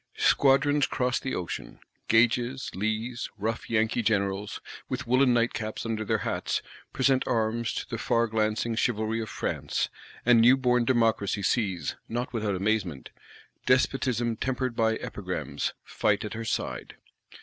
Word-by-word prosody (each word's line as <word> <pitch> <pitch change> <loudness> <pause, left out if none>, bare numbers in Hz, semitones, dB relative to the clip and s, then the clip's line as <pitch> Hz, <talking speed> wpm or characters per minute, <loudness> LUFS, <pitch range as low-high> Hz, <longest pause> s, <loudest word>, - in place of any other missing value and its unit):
Squadrons 140 +1 +4
cross 125 0 0
the 130 - -3
ocean: 90 -2 -5 0.3
Gages, 120 +3 +2
Lees, 110 +4 -2
rough 110 +2 -3
Yankee 115 +1 +1
Generals, 100 -2 0 0.3
"with - - -3
woollen 125 +2 +4
night 120 0 +2
caps 110 0 -4
under 110 -1 -2
their - - -1
hats," - - -1 0.3
present 130 0 +2
arms 115 0 0
to - - -4
the - - -4
far 115 0 +2
glancing 110 +1 0
Chivalry 110 -1 0
of 110 - -5
France; - - -2 0.4
and 120 -1 +6
new 125 +3 +7
born 125 -2 +2
Democracy 115 -5 +1
sees, 95 - 0
not 120 +2 -3
without 105 -4 -1
amazement, 95 -7 -1 0.6
"Despotism 125 -3 +2
tempered 130 -1 -2
by 110 -1 +2
Epigrams" - - -4
fight 105 0 0
at 105 - -5
her 115 +1 -5
side. - - -3
115 Hz, 140 wpm, -27 LUFS, 110-125 Hz, 0.6 s, new